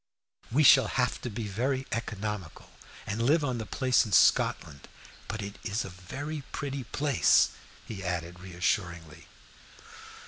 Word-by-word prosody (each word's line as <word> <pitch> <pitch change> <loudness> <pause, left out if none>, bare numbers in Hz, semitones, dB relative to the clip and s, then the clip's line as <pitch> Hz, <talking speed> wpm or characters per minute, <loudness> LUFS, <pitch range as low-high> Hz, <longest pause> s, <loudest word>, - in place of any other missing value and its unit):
We 145 +6 +3
shall - - +7
have 125 -1 -1
to 125 - -4
be 110 0 -5
very 130 +6 -1
economical, 105 -5 -5 0.3
and 105 +3 -3
live 145 +6 +3
on 130 -4 -1
the 110 - -5
place 130 -2 +2
in 110 - -7
Scotland. 70 -4 +3 0.4
But 110 0 -4
it 100 +1 -8
is 110 0 -2
a - - -7
very 140 - -6
pretty 140 -2 -4
place," 145 +2 +3 0.4
he 95 -3 -7
added, 90 -1 -4
reassuringly. 90 -3 -3
110 Hz, 140 wpm, -29 LUFS, 90-130 Hz, 0.4 s, shall